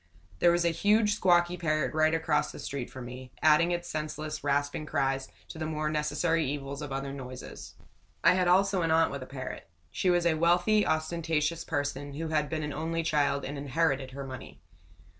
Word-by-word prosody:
There 175 - +5
was 170 0 +1
a - - +4
huge, 210 +5 +3
squawky 175 -1 +3
parrot 155 -2 0
right 155 +1 +3
across 150 -2 +1
the - - -10
street 135 -3 -5
from 130 -2 -8
me, 125 +1 -9
adding 160 +2 +5
its 175 0 -2
senseless, 155 -1 -4
rasping 145 +2 0
cries 135 -1 0 0.2
to 160 - -8
the 160 - -2
more 155 -1 -2
necessary 155 +2 +1
evils 140 0 -4
of 145 -2 -6
other 135 0 -3
noises. 130 -2 -9 0.5
I - - +7
had 180 -1 +2
also 190 +1 +3
an 165 - 0
aunt 160 0 +3
with 140 - -5
a 130 - -7
parrot. 130 -9 -7 0.2
She 185 - 0
was 175 -1 +3
a 170 - +4
wealthy, 175 +6 +3
ostentatious 160 0 0
person, 145 0 -3
who 160 +2 -4
had 150 -2 0
been 155 -1 -2
an 150 -1 -3
only 165 +2 -2
child 145 -3 +1
and 140 +1 -5
inherited 140 -1 0
her 135 +1 -7
money. 130 -1 -9
155 Hz, 195 wpm, -29 LUFS, 140-170 Hz, 0.5 s, I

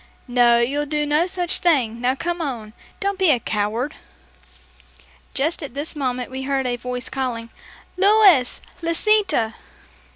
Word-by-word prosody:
"No, 245 -1 +4
you'll 280 +5 0
do 300 0 -1
no 300 +4 +2
such 360 -1 -1
thing! 250 -10 +1
Now, 255 +1 +1
come 345 +4 -3
on; 235 -8 -5 0.3
don't 400 -1 -2
be 375 -3 +4
a 255 - +4
coward!" 220 +6 -2 1.4
Just 315 +6 0
at 275 -4 -7
this 295 +3 -4
moment 255 -3 -3
we 260 0 -5
heard 270 0 -1
a 245 -1 0
voice 250 0 -5
calling, 235 -4 -4 0.5
"Louis! 390 - +5 0.2
Lisita!" 335 - +2
270 Hz, 140 wpm, -21 LUFS, 245-335 Hz, 1.4 s, Louis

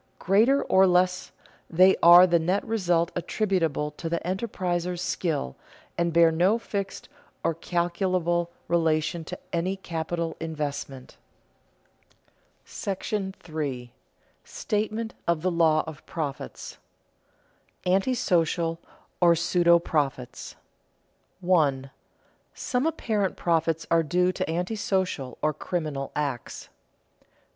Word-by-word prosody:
Greater 225 +9 +3
or 190 0 +4
less, 180 +1 +1 0.4
they 185 +3 +5
are 175 +1 +9
the 170 -2 +3
net 180 +5 0
result 175 -6 +1
attributable 170 -6 -1
to 165 +2 -6
the 170 0 0
enterpriser's 180 -3 -2
skill, 155 - -2 0.4
and 170 0 0
bear 165 0 +5
no 180 +7 +3
fixed 200 -4 -5 0.4
or 165 - +1
calculable 175 0 -1 0.2
relation 160 -1 +1
to - - -7 0.2
any 175 +3 0
capital 170 -2 -3
investment. 145 -4 -5 1.5
§ 195 -1 -4
III. 125 -4 -4 0.5
STATEMENT 220 +1 -3
OF 170 -2 +1
THE 185 - +1
LAW 160 -2 +3
OF 155 -1 -9
PROFITS 150 -5 -6 1.0
[Sidenote: 180 +1 +3
Antisocial 175 -7 +1 0.4
or 170 -1 +6
pseudo 170 0 +4
profits] 140 -7 -3 0.9
1. 145 -7 +1 0.6
_Some 255 +3 -1
apparent 215 - -1
profits 165 -1 0
are 165 0 +5
due 180 +3 +1
to 175 - -3
antisocial 180 - -2
or 155 0 +2
criminal 150 -4 -4
acts. 140 -5 -4
170 Hz, 105 wpm, -26 LUFS, 160-185 Hz, 1.5 s, are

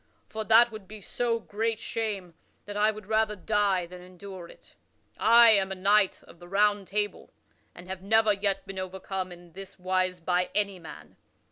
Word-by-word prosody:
For 220 0 -4
that 230 +2 +6
would 215 -3 -10
be 215 +2 -9
so 230 +3 -2
great 225 +1 -2
shame 210 -6 -4 0.3
that 205 - -7
I 210 +1 +3
would 215 -1 -6
rather 220 0 +1
die 190 -1 +1
than 180 +1 -11
endure 185 0 -10
it. - - -17 0.5
I 235 0 +7
am 195 -2 +2
a - - -3
knight 200 +1 +2
of 170 - -17
the 175 - -13
Round 205 +1 +1
Table, 205 +1 -3 0.4
and 175 - -12
have 190 0 -6
never 220 +2 +3
yet 200 -1 -1
been 195 -1 -6
overcome 185 0 -5
in 175 -1 -14
this 195 0 -11
wise 185 0 -1
by 180 +1 0
any 200 -3 0
man. 165 - -12
195 Hz, 180 wpm, -27 LUFS, 185-215 Hz, 0.5 s, I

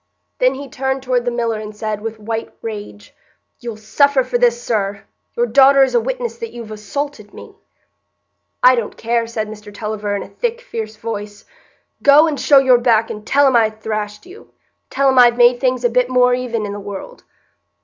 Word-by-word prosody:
Then 255 +1 +2
he 280 +1 -8
turned 265 +1 -3
toward 250 -2 0
the - - +1
miller 235 -2 -2
and 215 0 -8
said, 210 -1 -4
with 225 0 -5
white 225 +1 -4
rage, 205 -2 -8 0.5
"You'll 235 -3 -7
suffer 265 +5 +2
for 250 -1 -2
this, 240 -1 +3
sir. 200 -4 -2 0.3
Your 240 - +2
daughter 275 +3 +5
is 265 - 0
a 475 - +4
witness - - -4
that 460 - -5
you've 230 -2 -9
assaulted 215 +1 -6
me." - - -12 1.1
"I 255 - +8
don't 235 -4 -3
care," 230 0 -1
said 220 -2 -4
Mr 210 -1 -10
Tulliver, 210 0 -4
in 200 - -3
a - - -11
thick, 475 -1 -3
fierce 220 - -6
voice; 210 -2 -7 0.6
"go 285 +3 +6
and 300 -4 -2
show 285 - +5
your 260 -2 +5
back, 230 -2 +2
and 210 0 -9
tell 285 +1 +4
'em 265 -2 +3
I 225 -2 +4
thrashed 215 +1 -5
you. 370 +4 -15 0.4
Tell 275 +1 +1
'em 260 -1 +4
I've 240 -1 +6
made 245 0 +5
things 255 -1 0
a - - +4
bit 250 +1 +1
more 250 -1 +3
even 240 -3 -2
i' 205 - -5
the 205 - -6
world." 205 - -9
235 Hz, 200 wpm, -18 LUFS, 215-265 Hz, 1.1 s, I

